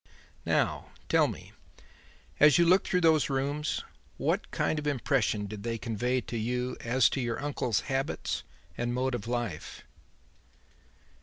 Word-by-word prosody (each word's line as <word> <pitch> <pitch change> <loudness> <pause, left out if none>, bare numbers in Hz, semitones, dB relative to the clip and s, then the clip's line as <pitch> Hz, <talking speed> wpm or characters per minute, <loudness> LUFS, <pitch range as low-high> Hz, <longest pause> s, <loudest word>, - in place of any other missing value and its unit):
"Now - - +1 0.2
tell - - +4
me: - - -8 0.9
as 150 -1 +7
you 170 - +5
looked 185 +3 +4
through 180 - +2
those 160 -3 +4
rooms, 140 +2 -1 0.3
what - - 0
kind 155 - 0
of 150 - -4
impression 125 -6 +1
did 105 0 -7
they 115 +1 -2
convey 120 +3 -1
to 120 - -5
you 125 +3 -1
as 125 +3 +3
to 135 - -2
your 120 -1 -2
uncle's 130 -6 -1
habits 135 +1 -2 0.3
and 120 0 -2
mode 130 +1 0
of 115 -2 -4
life?" 120 -9 -4
125 Hz, 145 wpm, -29 LUFS, 115-145 Hz, 0.9 s, as